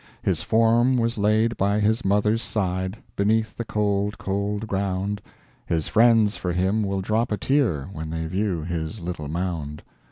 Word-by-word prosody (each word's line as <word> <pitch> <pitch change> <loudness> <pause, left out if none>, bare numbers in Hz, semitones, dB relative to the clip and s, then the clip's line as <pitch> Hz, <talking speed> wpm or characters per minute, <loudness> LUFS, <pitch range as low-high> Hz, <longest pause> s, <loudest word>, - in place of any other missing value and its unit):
His - - +1
form 115 +3 +3
was 115 -1 0
laid 110 +3 +2
by 100 +2 +1
his 110 +3 +1
mother's 105 +3 +2
side, 95 -2 -2 0.2
Beneath 110 +1 +1
the 115 - -3
cold, 105 -1 -1
cold 100 +2 -2
ground, 100 0 -2 0.5
His 80 -2 0
friends 115 -2 +4
for 90 -1 -3
him 95 +5 +1
will 100 -2 -1
drop 110 +5 0
a 105 - 0
tear 125 - +1
When 80 -2 -5
they 80 0 -3
view 90 -1 -1
his 85 +4 -4
little 85 -4 -5
mound." 80 -2 -4
100 Hz, 160 wpm, -24 LUFS, 90-110 Hz, 0.5 s, friends